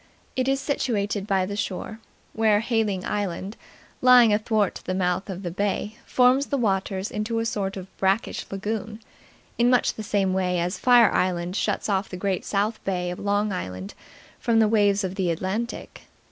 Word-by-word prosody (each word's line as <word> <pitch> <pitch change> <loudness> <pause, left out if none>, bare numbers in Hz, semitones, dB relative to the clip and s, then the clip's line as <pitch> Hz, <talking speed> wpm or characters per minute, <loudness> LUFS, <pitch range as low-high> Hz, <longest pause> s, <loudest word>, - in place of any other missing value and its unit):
It 255 0 0
is 270 0 +2
situated 210 -8 -1
by 190 -3 +2
the 200 +2 -5
shore, 210 +2 -4 0.3
where 215 -2 +3
Hayling 220 -5 0
Island, 200 0 -3 0.5
lying 250 -3 +7
athwart 215 -2 0
the 185 - -2
mouth 180 +1 -1
of 190 +1 -6
the 175 - -3
bay, 205 +3 -2
forms 255 +2 +3
the 280 - -1
waters 195 -4 -1
into 215 +2 -2
a 225 - 0
sort 195 -3 -2
of 190 0 -10
brackish 195 +3 0
lagoon, 215 +2 -4 0.6
in 240 +1 +4
much 250 -1 +3
the - - -7
same 200 -3 0
way 180 -1 0
as 175 +3 -2
Fire 245 -3 +6
Island 180 0 0
shuts - - -1
off 195 -1 0
the 185 - -6
Great 190 0 -2
South 210 +2 -1
Bay 180 -2 -2
of 180 - -7
Long 205 0 0
Island 95 - -5 0.5
from 230 -1 +1
the 220 -1 +5
waves 205 -2 +3
of 185 -1 -2
the 190 -3 -1
Atlantic. 190 +8 -3
205 Hz, 175 wpm, -25 LUFS, 190-225 Hz, 0.6 s, lying